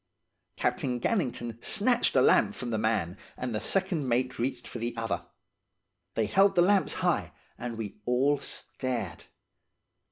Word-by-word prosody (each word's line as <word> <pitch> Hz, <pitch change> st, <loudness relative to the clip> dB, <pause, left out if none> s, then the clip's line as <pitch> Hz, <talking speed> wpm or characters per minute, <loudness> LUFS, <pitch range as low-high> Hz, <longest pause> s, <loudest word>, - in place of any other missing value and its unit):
"Captain 125 Hz, -2 st, 0 dB
Gannington 120 Hz, -, -2 dB
snatched -, -, +3 dB
a -, -, +6 dB
lamp -, -, +4 dB
from 120 Hz, -1 st, -4 dB
the 110 Hz, -, 0 dB
man 105 Hz, -5 st, 0 dB, 0.2 s
and 125 Hz, -2 st, -3 dB
the 105 Hz, -, 0 dB
second 175 Hz, -, 0 dB
mate 125 Hz, +2 st, 0 dB
reached 125 Hz, +3 st, -2 dB
for 120 Hz, -, -6 dB
the 120 Hz, +1 st, -3 dB
other. 115 Hz, 0 st, -2 dB, 0.9 s
They 110 Hz, -, +2 dB
held 195 Hz, -, +4 dB
the 175 Hz, -, +6 dB
lamps 195 Hz, +1 st, +3 dB
high, -, -, +1 dB, 0.2 s
and 120 Hz, -2 st, -5 dB
we 105 Hz, -2 st, -6 dB
all 135 Hz, +4 st, +2 dB
stared. 120 Hz, -8 st, -4 dB
120 Hz, 150 wpm, -29 LUFS, 115-140 Hz, 0.9 s, a